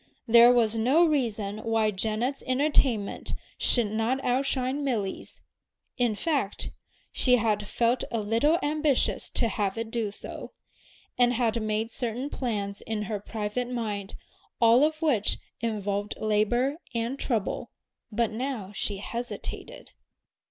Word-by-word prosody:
There 235 Hz, +1 st, +8 dB
was 230 Hz, -3 st, +3 dB
no 260 Hz, +10 st, +4 dB
reason 220 Hz, -9 st, 0 dB
why 225 Hz, -1 st, +1 dB
Janet's 220 Hz, +7 st, -1 dB
entertainment 255 Hz, -5 st, +1 dB, 0.3 s
should 240 Hz, -3 st, +3 dB
not 225 Hz, +4 st, 0 dB
out 260 Hz, +3 st, +1 dB
shine 265 Hz, +2 st, -1 dB
Milly's. 220 Hz, -8 st, -3 dB, 0.5 s
In 240 Hz, -4 st, +1 dB
fact, 275 Hz, -5 st, -1 dB, 0.4 s
she 250 Hz, -1 st, +4 dB
had 210 Hz, -3 st, 0 dB
felt 235 Hz, +3 st, +1 dB
a 230 Hz, -, -1 dB
little 230 Hz, +10 st, +2 dB
ambitious 300 Hz, -2 st, +1 dB
to 235 Hz, -, +1 dB
have 205 Hz, -1 st, -1 dB
it 225 Hz, 0 st, -4 dB
do 225 Hz, -3 st, -1 dB
so, 200 Hz, -, -8 dB, 0.7 s
and 245 Hz, 0 st, +5 dB
had 230 Hz, -1 st, +1 dB
made 215 Hz, +1 st, -1 dB
certain 245 Hz, +5 st, -3 dB
plans 205 Hz, -5 st, -3 dB
in 220 Hz, -1 st, -3 dB
her 210 Hz, 0 st, -3 dB
private 215 Hz, +4 st, -3 dB
mind 210 Hz, -5 st, -3 dB, 0.4 s
all 235 Hz, +3 st, +6 dB
of 310 Hz, +1 st, 0 dB
which 245 Hz, -10 st, +2 dB, 0.2 s
involved 205 Hz, -2 st, -2 dB
labor 230 Hz, +6 st, +1 dB, 0.2 s
and 235 Hz, +4 st, -1 dB
trouble; 225 Hz, -6 st, -1 dB, 0.4 s
but 225 Hz, +1 st, +1 dB
now 225 Hz, -4 st, -3 dB
she 200 Hz, 0 st, -1 dB
hesitated. 245 Hz, -, -6 dB
230 Hz, 130 wpm, -27 LUFS, 215-255 Hz, 0.7 s, There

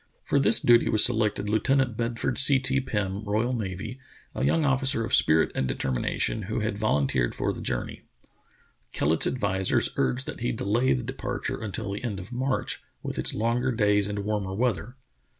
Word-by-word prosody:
For 140 Hz, -, +1 dB
this 140 Hz, -, +5 dB
duty 120 Hz, 0 st, +4 dB
was 110 Hz, -, +5 dB
selected 110 Hz, -3 st, +1 dB
Lieutenant 125 Hz, +3 st, +1 dB
Bedford 115 Hz, 0 st, -2 dB
C. 140 Hz, 0 st, +5 dB
T. 135 Hz, +1 st, +1 dB
Pirn, 105 Hz, -5 st, -3 dB
R.N., 110 Hz, 0 st, -2 dB, 0.4 s
a -, -, -3 dB
young 165 Hz, -2 st, +2 dB
officer 130 Hz, -4 st, +1 dB
of -, -, -3 dB
spirit 80 Hz, +1 st, +4 dB
and 65 Hz, -, -1 dB
determination, 65 Hz, -, -1 dB
who 110 Hz, -, -1 dB
had 110 Hz, -1 st, -2 dB
volunteered 70 Hz, -, 0 dB
for -, -, -1 dB
the -, -, -8 dB
journey. -, -, -3 dB, 0.9 s
Kellet's 80 Hz, +3 st, +2 dB
advisers 95 Hz, -6 st, +1 dB
urged 130 Hz, +2 st, 0 dB
that -, -, -7 dB
he 120 Hz, -, -1 dB
delay 115 Hz, -, +1 dB
the 65 Hz, -, -2 dB
departure -, -, -4 dB
until 105 Hz, -1 st, -4 dB
the 100 Hz, -, -6 dB
end 105 Hz, -6 st, -3 dB
of 95 Hz, +7 st, -9 dB
March, 130 Hz, +2 st, -2 dB, 0.2 s
with -, -, -4 dB
its -, -, +4 dB
longer 120 Hz, +4 st, 0 dB
days 105 Hz, -3 st, +2 dB
and 100 Hz, -1 st, -4 dB
warmer 100 Hz, -3 st, -2 dB
weather. 120 Hz, 0 st, -1 dB
110 Hz, 170 wpm, -26 LUFS, 100-125 Hz, 0.9 s, this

